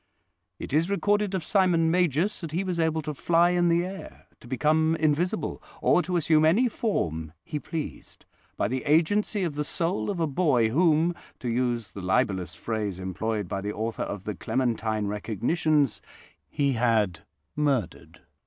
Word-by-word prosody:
"It - - -7
is 160 +4 +2
recorded 205 0 +1
of 185 - -2
Simon 175 -4 +3
Magus 180 +2 +1
that 165 -3 -6
he 180 +4 0
was 180 -3 -2
able 160 -1 +1
to 150 - -4
fly 170 +4 +3
in 175 -1 +2
the 170 +1 +2
air, 190 +1 -9
to - - -15
become 155 +6 +2
invisible, 160 +6 0 0.2
or - - +4
to 180 0 -1
assume 155 -1 +3
any 195 +11 +4
form 80 - -2
he 150 - -4
pleased, 155 +1 -7 0.3
by - - +1
the 130 +4 -3
agency 190 +7 +2
of 170 -4 -1
the 150 +1 -2
soul 170 +6 -2
of 195 -4 -2
a 165 - +2
boy 135 -7 +2
whom, 165 +4 +3 0.2
to 125 - -4
use 120 -2 -1
the 100 - -8
libellous 95 0 0
phrase 105 -5 -3
employed 105 +2 -3
by 95 - -3
the 105 +1 -3
author 110 +1 -3
of 100 -2 -4
the 105 - -3
Clementine 110 -1 -1
Recognitions, 120 - 0 0.5
he 140 -2 +1
had 110 -7 +1 0.4
'murdered'. 140 - -2
150 Hz, 165 wpm, -26 LUFS, 115-175 Hz, 0.5 s, or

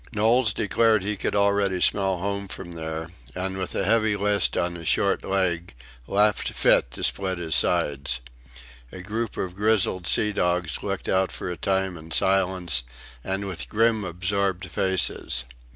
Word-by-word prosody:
Knowles 110 +2 +3
declared 110 0 +2
he 105 +2 -1
could 100 - -2
already 100 -2 +2
smell 95 0 +2
home 100 +2 -3
from 95 -2 -8
there, 80 0 -5 0.2
and 95 +1 -3
with 95 -1 -4
a 95 - 0
heavy 110 0 +3
list 100 0 +1
on 85 0 0
his 85 -2 -7
short 100 - +2
leg 90 -6 -1 0.3
laughed 105 +1 +2
fit - - +3
to - - -5
split 95 -2 0
his 80 -2 -3
sides. 70 -1 +1 0.7
A 95 - -8
group 110 +2 -3
of 90 -2 -3
grizzled 100 -3 +2
sea 105 -1 +2
dogs 90 -4 0
looked - - -4
out 95 0 +1
for 90 - -5
a - - -4
time 95 +1 -1
in 80 0 -11
silence 90 -6 +1 0.4
and 95 +1 -3
with 90 -4 -5
grim 110 0 +2
absorbed 95 +1 -1
faces. 90 -9 0
95 Hz, 160 wpm, -25 LUFS, 90-100 Hz, 0.7 s, Knowles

